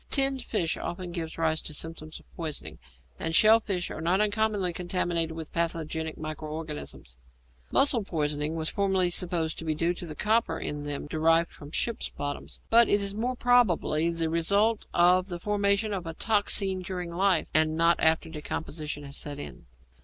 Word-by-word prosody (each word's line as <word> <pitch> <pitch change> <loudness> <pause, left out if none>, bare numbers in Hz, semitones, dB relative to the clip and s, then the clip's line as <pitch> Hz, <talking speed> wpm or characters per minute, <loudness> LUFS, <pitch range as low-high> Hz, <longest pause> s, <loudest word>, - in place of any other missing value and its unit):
Tinned 270 -1 +4
fish 175 -7 -1
often 175 0 -5
gives 165 -2 -5
rise 160 -1 +1
to 150 - -6
symptoms 155 0 -4
of - - -24
poisoning, 155 - -5 0.4
and 165 - -1
shell 220 +4 +7
fish 190 -5 -3
are - - -6
not 175 +4 +2
uncommonly 210 -3 +1
contaminated 175 -2 -1
with 160 -1 -7
pathogenic 160 -1 -2
micro 155 0 -6
organisms. 150 - -7 0.5
Mussel 260 -6 +4
poisoning 150 -3 -1
was 160 -1 -2
formerly 190 -2 +1
supposed 170 -3 0
to - - -5
be 155 -1 -1
due 170 +3 +1
to 175 0 -6
the 155 - -7
copper 220 +5 +1
in 150 0 -4
them 145 -1 -3
derived 165 +2 +2
from 145 - -12
ships' 230 +8 -1
bottoms, 145 0 -6
but 235 +1 +6
it 205 - +4
is 200 0 0
more 240 +5 -2
probably 205 -10 +3
the 165 -1 0
result 200 +7 +2
of 180 +2 +4
the 175 -3 -4
formation 205 +2 +1
of 180 -3 -4
a 165 - -5
toxine 200 -3 +1
during 180 -1 -5
life, 185 -1 +2
and 155 0 +2
not 170 +1 +4
after 160 0 +3
decomposition 150 -1 -5
has 140 0 -8
set 145 -1 -4
in. 145 - -9
170 Hz, 175 wpm, -28 LUFS, 160-200 Hz, 0.5 s, shell